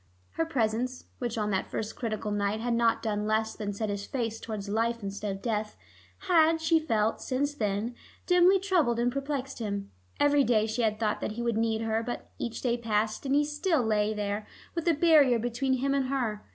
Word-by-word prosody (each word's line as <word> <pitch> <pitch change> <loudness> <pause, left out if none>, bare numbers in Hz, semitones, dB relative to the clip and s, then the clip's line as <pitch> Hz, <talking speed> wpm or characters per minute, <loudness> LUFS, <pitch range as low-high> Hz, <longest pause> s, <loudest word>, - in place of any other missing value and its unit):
Her 325 - -1
presence, 250 -2 -1
which 240 -2 -3
on 210 -1 0
that 190 - -1
first 215 0 -4
critical 215 -2 -3
night 205 +1 0
had 240 +1 -1
not 230 -1 +2
done 210 -1 -1
less 220 0 +1
than 210 -2 -3
set 210 +1 -3
his 200 0 -3
face 225 -1 -3
towards 215 -3 -5
life 230 +2 0
instead 200 +1 -3
of 195 0 -7
death, 215 -2 -2 0.5
had, 325 -2 +5
she 320 0 +3
felt, 225 -8 0
since 280 +2 -1
then, 215 -2 -1 0.3
dimly 360 +2 +5
troubled 355 -11 +2
and 240 +1 +1
perplexed 275 0 -3
him. 200 -3 -4 0.3
Every 290 -1 +4
day 220 -4 +3
she 220 +2 -2
had 215 -2 +1
thought 215 -2 0
that - - -2
he 235 +2 -4
would 235 -2 0
need 225 0 +1
her, 225 0 0
but 240 +1 -6
each 235 -1 -4
day 240 -2 +1
passed, 220 +2 -1
and 270 - +2
he 295 +1 +4
still 295 -1 +1
lay 215 -1 +1
there, 210 0 -3 0.3
with 335 0 -3
a 335 - +5
barrier 295 -6 +5
between 245 +3 -1
him 270 +2 +1
and 275 -2 +1
her. 240 -6 -1
230 Hz, 205 wpm, -29 LUFS, 215-275 Hz, 0.5 s, had